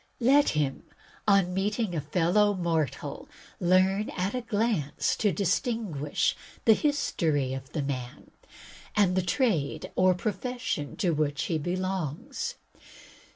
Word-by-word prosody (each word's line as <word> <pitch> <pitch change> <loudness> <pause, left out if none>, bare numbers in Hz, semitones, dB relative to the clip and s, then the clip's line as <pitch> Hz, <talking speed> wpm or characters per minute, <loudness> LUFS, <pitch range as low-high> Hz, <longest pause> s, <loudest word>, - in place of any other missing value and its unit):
Let 275 +4 +5
him, 140 -3 0 0.5
on 195 -3 +4
meeting 205 +1 -1
a 160 - -1
fellow 180 +7 +2
mortal, 165 -6 -2 0.3
learn 185 +3 +3
at 185 +2 -1
a 250 - -1
glance 215 - 0
to 210 - +2
distinguish 200 - 0 0.3
the 225 - +8
history 160 - 0
of 135 0 -7
the 150 - -1
man, 125 -3 -5 0.6
and 195 -3 +3
the 185 - +3
trade 175 - 0
or 185 0 +4
profession 220 - -3
to 180 - +1
which 150 -2 0
he 160 -2 -1
belongs. 185 - -3
185 Hz, 120 wpm, -28 LUFS, 155-210 Hz, 0.6 s, the